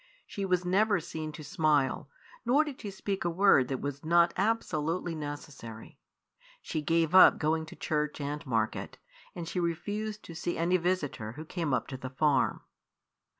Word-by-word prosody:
She 200 - -4
was 180 -1 +1
never 200 +2 +3
seen 155 -1 -5
to 155 - -8
smile, 145 -3 +1 0.3
nor 265 +6 +4
did 295 -4 -7
she 210 - -5
speak 195 0 -3
a 175 - +1
word 170 -7 +4
that 130 -1 -3
was 140 0 -4
not 170 +1 +4
absolutely 175 -6 0
necessary. 145 -7 -8 0.6
She 160 - -3
gave 165 +1 +1
up 185 - +9
going 160 +1 0
to - - -10
church 150 -1 -2
and 145 +1 -4
market, 110 -3 -1 0.4
and 170 -2 -5
she 180 - -2
refused 205 +5 -3
to 170 - -9
see 175 +1 -3
any 175 +2 +2
visitor 160 -11 -2
who 155 +5 -8
came 165 -2 -3
up 130 - +1
to 130 - -5
the 130 0 -6
farm. 135 0 +1
165 Hz, 170 wpm, -30 LUFS, 145-185 Hz, 0.6 s, up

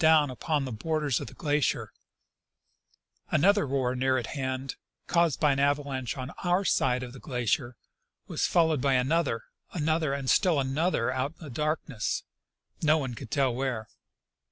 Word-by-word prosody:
125 160 -2 +6
doAvn - - -5
upon 150 +2 -1
the 130 - -5
borders 145 +3 0
of - - -6
the - - -11
glacier; 150 -6 0 1.4
another 195 +4 +4
roar 130 -2 0
near 130 +1 +2
at 120 - -2
hand, 130 -2 -3 0.3
caused 170 -4 +2
by 150 -2 +4
an 135 - 0
avalanche 140 -3 0
on 130 +1 -5
our 175 0 +3
own - - -6
side 125 -6 +2
of 125 -1 -7
the 135 - -10
glacier, 125 -1 -1 0.5
was - - 0
fol 165 -2 +4
lowed 155 -5 0
by 135 0 +3
another, 130 -2 +1 0.3
another, 155 -2 +1
and 140 -2 -5
still 170 +2 +4
another 135 -2 +1
out 130 +4 -1
in - - -11
the 145 - -8
darkness, 150 -4 -2 0.6
no 155 0 +4
one 135 -5 -3
could 120 0 -8
tell 135 -2 +2
where. 120 -4 -2
140 Hz, 175 wpm, -28 LUFS, 130-155 Hz, 1.4 s, 125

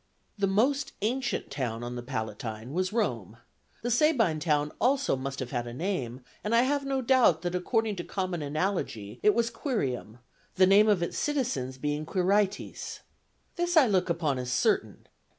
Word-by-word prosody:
The 200 -2 +1
most 265 +8 +1
ancient 250 +3 -1
town 120 -4 -3
on 120 0 -4
the 120 - -4
Palatine 110 -1 -5
was 185 +3 0
Rome; 115 - -2 0.5
the 240 - -1
Sabine 235 - +3
town 150 -2 +1
also 265 - +2
must 135 +1 -5
have 125 -2 -5
had 120 -2 -2
a 120 - -7
name, 130 -7 -3 0.2
and 215 +2 +1
I 235 - +5
have 280 +2 +1
no 270 -1 -1
doubt 230 -10 +4
that, 175 0 -2
according 215 +3 0
to 175 - -3
common 185 -3 -3
analogy, 145 - -2
it 210 - +4
was 230 0 +1
Quirium, 135 - -3 0.4
the 185 - +6
name 205 +3 +6
of 195 -5 +3
its 170 - -3
citizens 250 - -1
being 150 +2 -2
Quirites. 195 +2 0 0.6
This 350 0 +1
I 300 - +8
look 185 -5 +1
upon 155 -6 0
as 125 0 -4
certain. - - 0
180 Hz, 170 wpm, -28 LUFS, -, 0.6 s, I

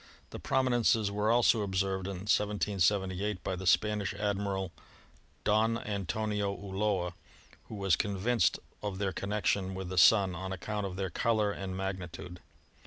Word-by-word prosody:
The - - -7
prominences 120 -5 +2
were 105 +1 0
also 115 -1 +4
observed 95 -1 -1
in 95 -2 -5
1778 100 -1 +1
by 95 - -2
the 95 0 -5
Spanish 105 0 +2
Admiral 100 -2 -1 0.7
Don 110 +2 +2
Antonio 105 0 -2
Ulloa, 95 -2 -1 0.6
who - - -6
was 95 -4 +2
convinced 100 +2 +1 0.2
of 100 -2 -3
their 100 -1 -1
connection 100 -1 -1
with 95 -1 -5
the 95 -1 +1
Sun 100 -3 +6
on 95 +2 -5
account 105 +2 -3
of 90 - -7
their 95 -2 -3
color 110 +1 +1
and 95 -2 -5
magnitude. 90 -2 -5
100 Hz, 140 wpm, -31 LUFS, 95-105 Hz, 0.7 s, Sun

